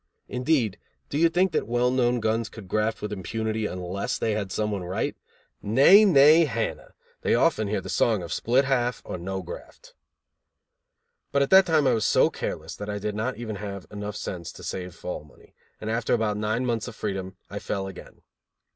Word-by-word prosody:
Indeed, 125 - 0 0.3
do 140 - -1
you 165 +1 +5
think 180 +2 +2
that - - -1
well 120 +1 +2
known 125 -1 +2
guns 110 0 0
could 110 -4 -11
graft 110 +3 -1
with 105 0 -3
impunity 110 +3 -2
unless 90 +2 -3
they 110 - 0
had 105 -3 -2
some 105 0 -1
one 100 -3 -3
right? 90 +2 -2 0.5
Nay! 140 - +7
Nay! 155 -1 +7
Hannah. 115 -5 -4 0.3
They - - +2
often 110 - +2
hear 105 - -1
the - - -9
song 110 -6 +2
of 85 - -4
split 130 +4 +2
half 125 -3 0
or 90 - -5
no 95 +2 -4
graft. - - -11 1.4
But 140 0 +3
at 140 - -3
that 190 0 +8
time 155 -3 +3
I 130 - +4
was 110 -2 +1
so - - +4
careless 80 +1 -5
that 105 0 -6
I 105 - -2
did 105 +1 -3
not 115 +5 -2
even 110 -3 -5
have 100 -2 -6
enough 105 0 -5
sense 85 -5 -5
to - - -12
save 90 -2 -5
fall 90 - -6
money, 75 - -20 0.3
and 110 - -7
after 115 +1 +1
about 110 -2 0
nine 110 +4 -1
months 115 -2 -1
of 120 - -8
freedom 95 -3 -4
I 100 - -4
fell 100 -1 -3
again. 95 -1 -11
110 Hz, 200 wpm, -26 LUFS, 100-125 Hz, 1.4 s, that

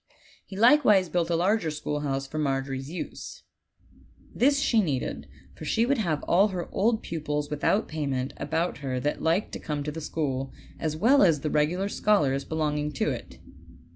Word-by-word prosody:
He 190 - -10
likewise 215 - +5
built 175 -1 0
a 170 - +2
larger 180 0 +1
schoolhouse 145 -2 -3
for 155 +3 -5
Margery's 135 -1 -2
use. 175 - -7 0.9
This 280 +3 +3
she 230 -5 +3
needed, 140 -9 -3 0.3
for - - -11
she 225 - +1
would 270 0 +1
have 165 -8 -1
all 195 +4 +4
her 185 -4 -4
old 220 +2 +1
pupils 150 -2 -3
without 150 +8 +1
payment 140 -4 -3
about 165 -2 -2
her 130 -3 -3
that 145 +4 -2
liked 170 +5 +1
to - - -6
come 150 -2 -3
to 150 - -3
the 160 +2 -6
school, 135 -4 -2 0.3
as 155 -1 -2
well 255 - +5
as 165 -7 +4
the 150 - -2
regular 170 +6 +1
scholars 145 -11 +1
belonging 150 -1 -1
to 135 - 0
it. - - -7
155 Hz, 170 wpm, -27 LUFS, 145-195 Hz, 0.9 s, likewise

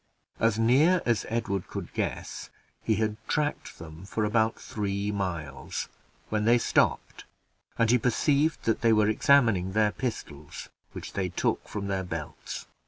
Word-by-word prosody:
As 115 -1 +2
near 140 +11 +4
as 120 -3 +1
Edward 110 -5 -2
could - - -7
guess, - - -4 0.3
he 110 - +1
had 110 0 -1
tracked 150 0 -2
them 80 +3 -10
about 110 +1 +2
three 100 -1 -2
miles, 85 -8 -4 0.4
when 105 -1 0
they 120 +2 +6
stopped, - - 0 0.5
and 115 -1 +3
he 125 - +4
perceived 140 +6 +1
that 115 - 0
they 115 -1 +4
were 105 -1 +4
examining 110 -6 +3
their 105 0 +3
pistols, 80 - -6 0.2
which - - -8
they 95 -2 -1
took 90 - -1
from 105 -2 -4
their 95 -1 -1
belts. 80 -4 -6
110 Hz, 145 wpm, -28 LUFS, 95-115 Hz, 0.5 s, they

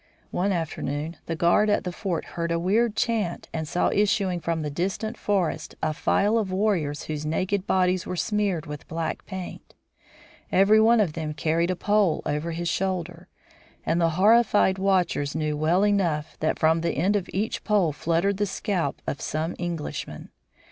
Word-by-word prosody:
One 195 +3 0
afternoon 160 -2 -3
the 165 - -2
guard 175 +5 +3
at 205 - +2
the 180 - -3
fort 175 -1 -3
heard 170 0 -2
a 170 - +1
weird 210 +6 +1
chant 220 -7 -1
and 160 -1 -3
saw 175 - +1
issuing 195 -3 +1
from 165 -1 -2
the 150 - -3
distant 195 +8 -2
forest 195 -6 -1
a 155 0 +1
file 210 +8 +2
of 200 -4 -2
warriors 185 -7 0
whose 155 -1 -4
naked 185 +5 -1
bodies 185 -1 +1
were 185 - -3
smeared 195 -2 0
with 150 -1 -8
black 165 -1 -3
paint. 190 -1 -8 0.8
Every 200 +3 +5
one 230 0 +5
of 175 -7 0
them 155 -2 -4
carried 165 +3 +1
a 185 - 0
pole 205 -2 +1
over 150 +3 -2
his 170 +1 -3
shoulder, 180 -1 -2 0.6
and 170 +1 +1
the 165 - +4
horrified 205 -2 +4
watchers 185 -7 +1
knew 155 -1 -1
well 165 +6 +2
enough 170 -7 0
that 155 - 0
from 160 +1 +3
the 170 - 0
end 190 +7 +2
of 200 -3 -1
each 210 +4 -2
pole 200 -7 +2
fluttered 170 +6 0
the 205 0 0
scalp 185 -7 -2
of 140 - -4
some 160 +3 -2
Englishman. 170 -3 -5
180 Hz, 175 wpm, -25 LUFS, 160-200 Hz, 0.8 s, Every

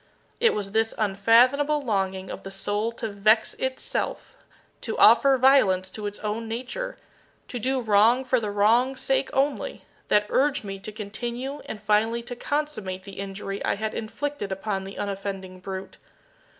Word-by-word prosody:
It 470 0 +4
was 200 -2 -3
this 225 +1 +1
unfathomable 235 +8 +4
longing 190 -5 -1
of - - -7
the 195 - -8
soul 205 +3 -1
to 230 - -4
vex 215 +2 +3
itself 260 0 -3 0.5
to - - -4
offer 275 -1 +6
violence 195 -9 +4
to 210 +1 -5
its 205 - -5
own 215 +2 -3
nature 255 - -4 0.5
to 245 - -4
do 260 +3 0
wrong 225 +3 +4
for 255 0 +2
the 215 -2 -3
wrong's 230 +6 +3
sake 270 0 +1
only 275 +1 -1 0.2
that 210 0 +3
urged 285 -1 +2
me 195 -1 -6
to 215 - -7
continue 240 +6 -5
and 215 - -6
finally 220 +3 +2
to 245 +1 -6
consummate 240 -10 -3
the 195 0 -10
injury 195 0 -5
I - - +1
had 215 +1 -3
inflicted 230 0 -4
upon 195 0 -3
the 195 - -9
unoffending 195 -2 -5
brute. 190 +1 -7
215 Hz, 160 wpm, -25 LUFS, 195-255 Hz, 0.5 s, offer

